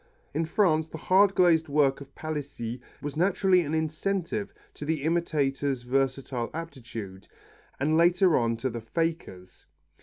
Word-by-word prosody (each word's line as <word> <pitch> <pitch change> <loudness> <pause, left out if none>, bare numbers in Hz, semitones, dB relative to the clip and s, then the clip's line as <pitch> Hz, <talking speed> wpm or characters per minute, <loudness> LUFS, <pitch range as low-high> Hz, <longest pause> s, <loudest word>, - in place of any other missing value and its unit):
In 160 +3 0
France 160 -4 +2
the 160 - -8
hard 195 +4 +4
glazed 170 -3 +4
work 140 -2 +2
of 140 0 -12
Palissy 140 -6 -5 0.2
was 145 0 -4
naturally 185 +2 +3
an 155 -1 -2
incentive 180 +5 -2 0.2
to - - -9
the 155 -1 -1
imitator's 145 -5 0
versatile 130 -1 -1
aptitude, 115 -12 -7 0.5
and 150 +4 +2
later 175 +1 +4
on 115 -1 +1
to 130 +2 -2
the 115 0 -5
faker's. 115 - -4
155 Hz, 140 wpm, -27 LUFS, 130-170 Hz, 0.5 s, hard